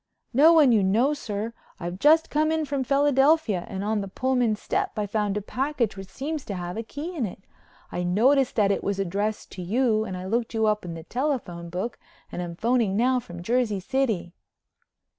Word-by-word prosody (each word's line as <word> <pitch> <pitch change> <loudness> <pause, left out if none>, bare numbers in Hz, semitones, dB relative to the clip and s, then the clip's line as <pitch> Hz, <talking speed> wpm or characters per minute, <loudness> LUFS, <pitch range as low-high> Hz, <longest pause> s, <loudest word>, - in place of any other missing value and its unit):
"No 295 +7 +7
one 305 -6 +6
you 220 -3 +4
know, 225 +10 +3
sir. 225 -5 -4 0.3
I've 175 +2 -5
just 315 +5 +4
come 310 +1 +2
in 320 -1 0
from 280 -2 -1
Philadelphia 275 - +3
and 195 0 -4
on 215 0 0
the 195 - -5
Pullman 245 +1 +1
step 390 - -2
I 210 - 0
found 205 0 -1
a 210 - -3
package 255 -2 -1
which 195 -1 -8
seems 295 +6 -4
to 200 - -4
have 175 0 -5
a 225 - -2
key 295 +10 -6
in 255 -9 -1
it. 190 +1 -11 0.5
I 175 - -2
noticed 245 +10 +3
that 205 -3 +3
it - - -1
was 200 -1 -1
addressed 200 +3 -2
to 185 - -7
you 220 +3 +1
and 185 -4 -5
I 180 - -6
looked 230 +3 -1
you 220 0 +2
up 210 -2 +1
in 170 -1 -5
the 165 - -8
telephone 230 - -3
book 185 +7 -4 0.3
and - - -4
am 170 -1 -5
phoning 225 -1 +1
now 250 +2 +3
from 175 -6 -9
Jersey 230 -1 +1
City." 220 -5 -1
220 Hz, 205 wpm, -25 LUFS, 195-270 Hz, 0.5 s, No